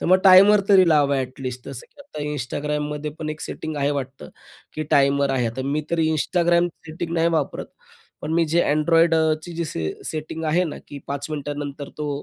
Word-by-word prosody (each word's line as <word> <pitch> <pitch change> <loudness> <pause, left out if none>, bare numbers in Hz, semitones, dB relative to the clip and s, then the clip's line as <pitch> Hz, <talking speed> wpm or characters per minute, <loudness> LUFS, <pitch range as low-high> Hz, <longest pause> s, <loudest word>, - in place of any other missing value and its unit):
तर - - -3
मग 185 +1 +5
टाईमर 195 +2 +8
तरी 190 -3 +6
लावा 145 -3 +3
ॲट 130 0 -4
लीस्ट. 125 -1 -6
जसं 135 -3 -8
की - - -18
आता 155 - -8
Instagramमध्ये 150 +2 -3
पण 155 - -4
एक 155 0 -7
सेटिंग 155 -1 -6
आहे 140 0 0
वाटतं 135 -2 -5 0.5
की 155 - -3
टाईमर 140 0 +3
आहे. 125 -3 0
आता 120 +4 -4
मी 145 +3 -1
तरी 165 -2 +1
Instagram 175 +2 +2 0.2
सेटिंग 165 +1 -5
नाही 165 0 +2
वापरत, 160 - -2 0.6
पण 155 - -3
मी 170 -1 +3
जे 170 +2 +3
Android 165 +2 +3
अ, 160 -1 +3
ची 175 - -9
जी 170 +1 -2
सी 80 - -3
सेटिंग 160 +1 -5
आहे 165 +4 +2
ना 160 - -6
की 145 - -8
5 140 0 -4
मिनिटानंतर 145 -1 -5
तो 150 -1 -3
150 Hz, 200 wpm, -22 LUFS, 140-165 Hz, 0.6 s, टाईमर